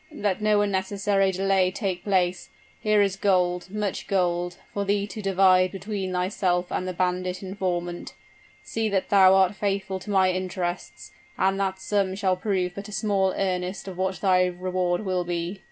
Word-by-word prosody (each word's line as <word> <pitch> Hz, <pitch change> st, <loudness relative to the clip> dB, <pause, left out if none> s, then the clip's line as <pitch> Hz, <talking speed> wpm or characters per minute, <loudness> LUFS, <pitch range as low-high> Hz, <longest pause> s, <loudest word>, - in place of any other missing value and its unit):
"Let 205 Hz, -1 st, -2 dB
no 210 Hz, -1 st, +3 dB
unnecessary 195 Hz, 0 st, +1 dB
delay 190 Hz, 0 st, +2 dB
take 185 Hz, -2 st, -3 dB
place. 185 Hz, -3 st, 0 dB, 0.3 s
Here 215 Hz, -1 st, +3 dB
is 195 Hz, -1 st, 0 dB
gold 180 Hz, -2 st, +1 dB
much 210 Hz, -1 st, -3 dB
gold, 175 Hz, -2 st, 0 dB, 0.2 s
for 200 Hz, -, -1 dB
thee 200 Hz, 0 st, 0 dB
to 205 Hz, +1 st, -7 dB
divide 185 Hz, -2 st, +4 dB
between 195 Hz, -1 st, -4 dB
thyself 180 Hz, -1 st, 0 dB
and 185 Hz, -, -2 dB
the 185 Hz, -, -3 dB
bandit 180 Hz, +1 st, -1 dB
informant. 180 Hz, -2 st, -3 dB, 0.5 s
See 225 Hz, -1 st, -2 dB
that 195 Hz, -2 st, -1 dB
thou 190 Hz, -1 st, +6 dB
art 190 Hz, 0 st, +4 dB
faithful 195 Hz, -2 st, -2 dB
to 195 Hz, -, -11 dB
my 190 Hz, -2 st, +3 dB
interests, 185 Hz, -1 st, -4 dB, 0.3 s
and 195 Hz, +1 st, +1 dB
that 190 Hz, -1 st, -1 dB
sum 190 Hz, 0 st, 0 dB
shall 190 Hz, -2 st, +1 dB
prove 185 Hz, -1 st, -1 dB
but 200 Hz, +3 st, -8 dB
a -, -, -9 dB
small 195 Hz, -2 st, +1 dB
earnest 185 Hz, 0 st, -2 dB
of 190 Hz, -, -6 dB
what 190 Hz, +1 st, -2 dB
thy 185 Hz, -2 st, +4 dB
reward 180 Hz, 0 st, -1 dB
will 185 Hz, -1 st, 0 dB
be." 175 Hz, +2 st, -3 dB
190 Hz, 170 wpm, -25 LUFS, 180-200 Hz, 0.5 s, thou